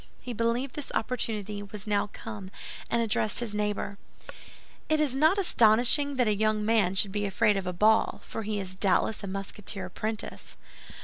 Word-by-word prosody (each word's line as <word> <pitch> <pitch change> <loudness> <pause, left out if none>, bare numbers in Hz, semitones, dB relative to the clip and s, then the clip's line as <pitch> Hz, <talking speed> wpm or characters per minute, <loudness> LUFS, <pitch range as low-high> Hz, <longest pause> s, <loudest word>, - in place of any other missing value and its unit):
He 250 - -6
believed 235 +4 -1
this 295 - -6
opportunity 215 -4 -2
was 205 0 -8
now 205 -1 +1
come 210 -4 -8 0.4
and 235 0 +1
addressed 215 -1 +1
his 235 -3 +3
neighbor: 210 -1 -2 0.9
"It 310 0 +2
is 295 -4 +1
not 315 +8 +3
astonishing 260 - +4
that 255 - +3
that 215 -1 +2
young 215 0 +1
man 210 -4 +2
should 195 0 +2
be 205 0 -1
afraid 205 +2 +2
of 195 -2 -3
a - - 0
ball, 215 +5 +3
for - - -5
he 210 -1 -2
is 185 -1 -6
doubtless 200 +3 +1
a - - -4
Musketeer 195 0 -4
apprentice." 215 +4 -5
215 Hz, 175 wpm, -28 LUFS, 200-230 Hz, 0.9 s, astonishing